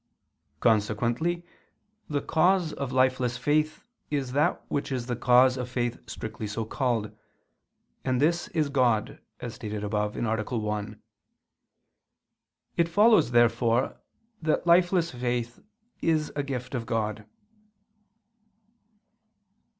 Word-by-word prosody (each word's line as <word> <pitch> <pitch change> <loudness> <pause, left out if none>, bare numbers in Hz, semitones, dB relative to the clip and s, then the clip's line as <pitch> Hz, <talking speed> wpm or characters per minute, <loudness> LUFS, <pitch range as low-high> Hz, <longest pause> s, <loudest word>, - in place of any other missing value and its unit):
Consequently 120 +10 +1 0.6
the 145 -2 -1
cause 175 0 +2
of 140 -2 -4
lifeless 130 -1 +2
faith 155 +1 0 0.3
is 140 -4 -2
that 150 +6 +1
which 140 - -2
is 125 -3 -2
the 125 -1 -2
cause 125 +2 +5
of 125 -1 -4
faith 120 -1 -2
strictly 110 -1 -5
so 110 +2 -3
called: 115 -3 -1 0.9
and 130 -1 0
this 170 +4 +2
is 155 -4 0
God, 125 -6 +1 0.2
as 120 -2 -5
stated 105 -2 -5
above 105 0 -1
(A. 110 +1 -1
1). 105 0 -3 1.8
It 170 0 +2
follows, 205 - +5
therefore, 120 +1 +2 0.4
that 155 0 0
lifeless 175 0 +4
faith 120 -1 -3 0.4
is 155 -2 +1
a 145 - 0
gift 130 -2 -5
of 120 -3 -3
God. 110 -2 -2
125 Hz, 110 wpm, -27 LUFS, 115-150 Hz, 1.8 s, cause